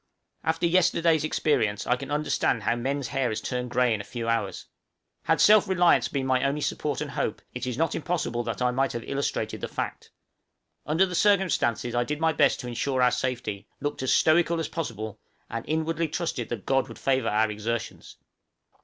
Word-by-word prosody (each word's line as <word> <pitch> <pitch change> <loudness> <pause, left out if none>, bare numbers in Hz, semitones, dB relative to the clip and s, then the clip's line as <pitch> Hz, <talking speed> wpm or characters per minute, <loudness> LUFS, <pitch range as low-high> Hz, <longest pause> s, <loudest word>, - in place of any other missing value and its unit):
After 165 +1 0
yesterday's 170 -2 +3
experience 110 -9 0
I 125 - +2
can 135 +2 -8
understand 145 -6 0
how 115 - +1
men's 135 +2 -2
hair 135 -3 0
has 110 -1 -2
turned 125 +2 -3
grey 125 -1 +2
in 105 - -2
a - - -8
few 115 +1 -5
hours. 115 0 -1 0.6
Had - - +2
self 215 -1 +6
reliance 180 -2 +4
been 135 -2 -2
my 130 0 +2
only 140 +2 0
support 145 0 -2
and 150 -1 -4
hope, 110 - -2
it 125 +1 -4
is 125 -2 -3
not 165 +2 +1
impossible 155 -8 -2
that - - -2
I 125 - +3
might 135 +2 0
have 120 -1 -4
illustrated 140 0 -2
the - - -2
fact. - - -5 0.8
Under 160 +5 +3
the 180 - -6
circumstances 180 - +2
I 120 0 +2
did 150 +4 -3
my 160 0 +2
best - - +3
to 125 - -7
insure 125 +2 0
our 125 - +5
safety, 125 -5 -3
looked 145 -2 -3
as 130 - 0
stoical 170 +1 +3
as 165 - -3
possible, 110 - -5 0.3
and 115 0 -3
inwardly 160 +1 0
trusted 155 -6 -3
that 115 -5 -5
God 135 -1 +2
would - - -10
favor 130 -4 +1
our 110 +1 +2
exertions. 110 +2 -5
135 Hz, 195 wpm, -26 LUFS, 120-160 Hz, 0.8 s, self